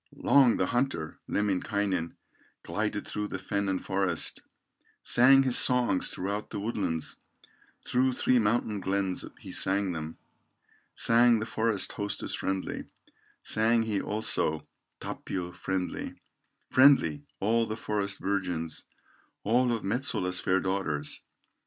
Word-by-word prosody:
Long 135 -4 +4
the - - +1
hunter, 120 - -2
Lemminkainen, 100 -3 -1 0.5
Glided - - -2
through 105 0 -4
the 95 - -4
fen 100 +1 -2
and 95 -1 -2
forest, 95 -3 0 0.6
Sang 135 +3 +6
his 130 -2 +3
songs 125 -7 +2
throughout 100 +3 -4
the - - -5
woodlands, 100 -7 -3 0.7
Through 130 +1 +2
three 125 0 +2
mountain 105 -1 0
glens 95 0 -1
he - - -10
sang 95 0 +2
them, 80 -1 -6 0.8
Sang 120 0 +4
the 110 - -3
forest 110 -3 0
hostess 100 -1 -3
friendly, 95 0 -3 0.6
Sang 115 +1 +2
he, 105 -3 -1
also, 105 -7 +1 0.3
Tapio 90 -2 -5
friendly, 90 0 -4 0.6
Friendly, 130 - +5 0.2
all 115 +3 +1
the 110 - -4
forest 100 -3 -2
virgins, 90 -5 -3 0.6
All 120 +3 +2
of 115 -2 -2
Metsola's 95 -5 -1
fair 95 +1 +1
daughters. 90 -6 -2
100 Hz, 120 wpm, -28 LUFS, 95-115 Hz, 0.8 s, Sang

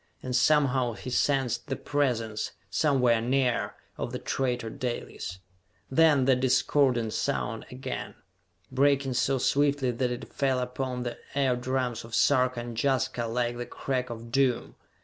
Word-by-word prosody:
And 125 -1 -2
somehow 130 -2 +3
he 125 +3 -7
sensed 135 -1 +1
the 135 - -1
presence, 120 -8 -1 0.2
somewhere 125 -6 +3
near, 125 0 +1 0.2
of - - -3
the - - -3
traitor 125 -4 -2
Dalis! 120 -7 -5 0.5
Then 150 -2 +5
that 130 -1 +4
discordant 125 -3 +2
sound 110 +1 -2
again, 130 0 -5 0.6
breaking 135 0 +2
so 135 +2 +1
swiftly 140 0 +2
that 125 +1 -1
it 125 - -6
fell 135 -2 +1
upon 125 0 -3
the 120 -1 -5 0.2
eardrums 130 -2 0
of 115 0 -6
Sarka 130 -1 +3
and 120 -1 -7
Jaska 130 -3 0
like 120 +1 -1
the 120 - -5
crack 130 -2 -2
of 115 0 -8
doom. 130 -2 +1
125 Hz, 140 wpm, -28 LUFS, 120-135 Hz, 0.6 s, Then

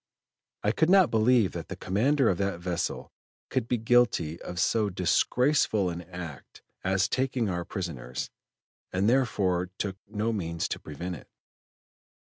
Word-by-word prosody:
"I 105 - +3
could 160 +8 +2
not 190 -2 +6
believe 115 -2 +4
that 85 -3 -6
the - - -6
commander 130 +8 +2
of 90 - +1
that 100 -3 -1
vessel 90 -1 -3 0.4
could 125 -3 0
be 125 - +1
guilty 110 -9 +2
of 90 - -6
so 110 0 +2
disgraceful 100 - +2
an 85 +1 -5
act 85 -4 -9 0.2
as 95 0 +2
taking 130 -2 0
our 90 -1 -2
prisoners, 80 - -5 0.6
and 95 +2 +1
therefore 100 -8 +2
took 95 -2 -3
no 110 +2 -1
means 85 -5 -2
to - - -3
prevent 85 +4 -6
it." - - -15
100 Hz, 145 wpm, -28 LUFS, 90-115 Hz, 0.6 s, not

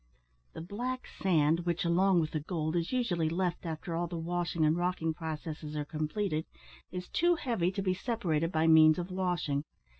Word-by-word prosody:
The - - -7
black 245 +8 -4
sand, 165 -3 +3
which, 175 0 -1
along 180 +1 +4
with 155 - -2
the 155 - -1
gold, 155 0 -2
is 170 0 0
usually 180 -11 +1
left 175 0 -1
after 165 +2 -4
all 175 +1 -1
the 170 0 -5
washing 170 -1 0
and 155 +1 +3
rocking 175 -2 0
processes 155 -1 -5
are 150 -1 -2
completed, 155 +2 -2 0.4
is 180 0 -5
too 345 +1 +2
heavy 230 - 0
to 195 0 -3
be 185 -1 +2
separated 180 -7 -1
by 160 -1 +2
means 155 -1 +7
of 180 +1 -4
washing. 180 -6 -1
170 Hz, 180 wpm, -31 LUFS, 160-185 Hz, 0.4 s, means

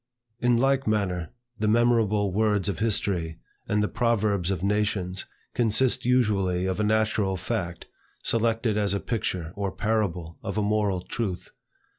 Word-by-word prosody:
In 120 0 +3
like 135 +1 +2
manner, 95 -6 0 0.3
the 105 - +1
memorable 110 -3 +3
words 105 -1 +1
of 100 -5 -2
history, 95 -7 0 0.3
and 105 0 +1
the - - +1
proverbs 105 -7 +1
of 95 -2 -2
nations, 100 -2 0 0.3
consist 120 +2 +2
usually 100 -8 +2
of 95 +1 -1
a - - +2
natural 110 -2 +1
fact, 90 -2 -3 0.4
selected 115 -1 +1
as 100 -1 +1
a - - 0
picture 90 -8 -3
or 100 -1 -2
parable 90 -7 -2
of - - -4
a 105 - +2
moral 105 -3 +1
truth. 95 -1 -4
105 Hz, 145 wpm, -26 LUFS, 95-110 Hz, 0.4 s, In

